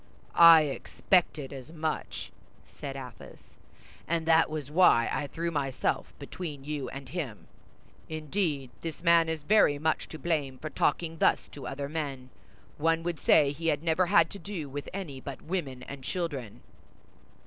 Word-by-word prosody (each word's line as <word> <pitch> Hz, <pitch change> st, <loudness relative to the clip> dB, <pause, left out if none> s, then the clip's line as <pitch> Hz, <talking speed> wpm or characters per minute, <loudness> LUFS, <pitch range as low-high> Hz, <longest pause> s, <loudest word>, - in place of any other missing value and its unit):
"I 165 Hz, -2 st, +9 dB
expected 150 Hz, 0 st, 0 dB
as 135 Hz, +2 st, -9 dB
much," 160 Hz, -2 st, -4 dB, 0.3 s
said 140 Hz, -2 st, -8 dB
Athos; 130 Hz, -2 st, -11 dB, 0.5 s
"and 165 Hz, -1 st, 0 dB
that 160 Hz, 0 st, +5 dB
was 150 Hz, -2 st, -5 dB
why 150 Hz, -9 st, +5 dB
I 145 Hz, -, -1 dB
threw 170 Hz, +4 st, -3 dB
myself 135 Hz, -4 st, -1 dB
between 145 Hz, -1 st, -7 dB
you 145 Hz, -1 st, -4 dB
and 135 Hz, 0 st, -8 dB
him. 130 Hz, -, -5 dB, 0.6 s
Indeed, 155 Hz, -4 st, -2 dB
this 165 Hz, 0 st, -6 dB
man 170 Hz, -1 st, +5 dB
is 160 Hz, -2 st, -3 dB
very 150 Hz, -5 st, +4 dB
much 160 Hz, +2 st, -1 dB
to 155 Hz, -, -7 dB
blame 145 Hz, -4 st, -1 dB
for 155 Hz, +3 st, -6 dB
talking 165 Hz, +2 st, 0 dB
thus -, -, +3 dB
to 140 Hz, -, -8 dB
other 140 Hz, +1 st, -4 dB
men; 140 Hz, -4 st, -5 dB, 0.5 s
one 165 Hz, +1 st, +2 dB
would 170 Hz, -3 st, -3 dB
say 145 Hz, -3 st, +5 dB
he 165 Hz, +3 st, -5 dB
had 150 Hz, -1 st, +1 dB
never 170 Hz, +2 st, +2 dB
had 170 Hz, -3 st, +4 dB
to 200 Hz, -, -8 dB
do 190 Hz, -8 st, -5 dB
with 140 Hz, +1 st, -6 dB
any 160 Hz, -9 st, -6 dB
but 140 Hz, 0 st, -8 dB
women 145 Hz, -8 st, -3 dB
and 140 Hz, 0 st, -9 dB
children." 140 Hz, -, -4 dB
155 Hz, 160 wpm, -29 LUFS, 140-165 Hz, 0.6 s, I